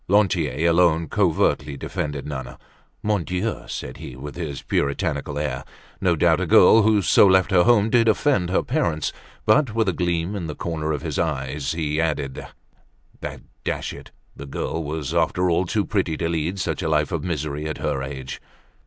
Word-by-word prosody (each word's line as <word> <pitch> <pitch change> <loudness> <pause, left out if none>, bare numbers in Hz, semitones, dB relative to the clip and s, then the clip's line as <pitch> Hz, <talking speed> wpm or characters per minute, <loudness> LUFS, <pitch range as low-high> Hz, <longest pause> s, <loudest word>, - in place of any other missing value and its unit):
Lantier 85 -7 +2
alone 85 -1 +3
covertly 70 0 +1
defended 75 +1 -4
Nana. 65 -3 -6 0.5
Mon 105 -4 +1
Dieu! 90 +6 -3
said 65 - -6
he, - - -8
with 70 +3 -8
his 80 -6 -5
puritanical 75 0 -1
air, 75 -4 -2 0.4
no - - +3
doubt - - +3
a - - -1
girl 115 - +7
who 105 -1 +3
so 100 - +6
left 95 +1 +4
her 90 -2 +5
home 110 -2 +4
did 115 -2 +4
offend 110 - +2
her 95 - +1
parents; 120 - -1 0.3
but, 115 0 +3
with 110 -2 +2
a 95 - +2
gleam 85 +2 -1
in 90 -5 -4
the 75 - -5
corner 80 -2 -3
of 75 -3 -3
his - - -3
eyes, 70 -2 -2
he 80 -1 -1
added 75 -5 -2 0.8
that, - - -6 0.2
dash - - -3
it! - - -11 0.3
the 70 - -9
girl 80 +4 -3
was, 75 0 -4
after 85 +2 +2
all, 85 +2 +1
too 105 +3 0
pretty 90 -6 -1
to 85 - -1
lead 85 +3 -1
such 90 - -2
a - - -1
life 75 -1 +1
of 80 -4 -2
misery 75 -3 -3
at 75 - -4
her 70 -3 -2
age. 65 -1 -6
80 Hz, 185 wpm, -23 LUFS, 75-95 Hz, 0.8 s, girl